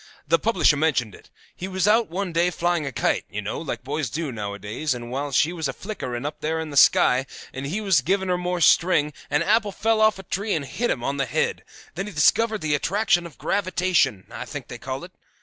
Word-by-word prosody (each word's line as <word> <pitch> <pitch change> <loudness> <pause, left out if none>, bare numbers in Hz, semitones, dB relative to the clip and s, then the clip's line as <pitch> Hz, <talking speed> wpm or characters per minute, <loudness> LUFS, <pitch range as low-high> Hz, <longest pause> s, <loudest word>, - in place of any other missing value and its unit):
The 165 +2 +3
publisher 175 -7 +3
mentioned 135 -8 +1
it. - - -16 0.3
He 185 - -5
was 190 0 0
out 220 +2 +4
one 185 +1 -3
day 170 +2 +3
flying 175 -3 -1
a - - -3
kite, - - 0
you 100 - -5
know, 105 +6 -4
like 155 -4 -5
boys 140 0 -2
do 155 -3 -3
nowadays, 105 +6 -3
and 120 0 -7
while 140 +2 -3
she 150 +5 +2
was 160 -4 -2
a 135 - -3
flickering 130 - -5
up 150 - -5
in 160 0 -2
the - - -7
sky, 135 -1 +5 0.3
and 135 +1 -5
he 195 +9 -2
was 190 -9 +3
giving 190 +6 0
her 180 - +2
more 180 0 -2
string, 155 -3 +4 0.2
an 145 +3 +2
apple 210 +2 +2
fell 220 +2 +1
off 215 -2 +4
a 195 - -9
tree 200 +4 -2
and 150 -3 -2
hit 240 - -2
him 120 - -1
on 140 +2 -1
the 135 -1 0
head; - - -1 0.3
then 195 +5 -4
he 210 - -8
discovered 215 +8 +3
the 155 -2 0
attraction 175 +3 +1
of 160 - -17
gravitation, 185 - +1
I - - -6
think - - -8
they - - -7
call - - -5
it. - - -10
160 Hz, 230 wpm, -24 LUFS, 140-190 Hz, 0.3 s, sky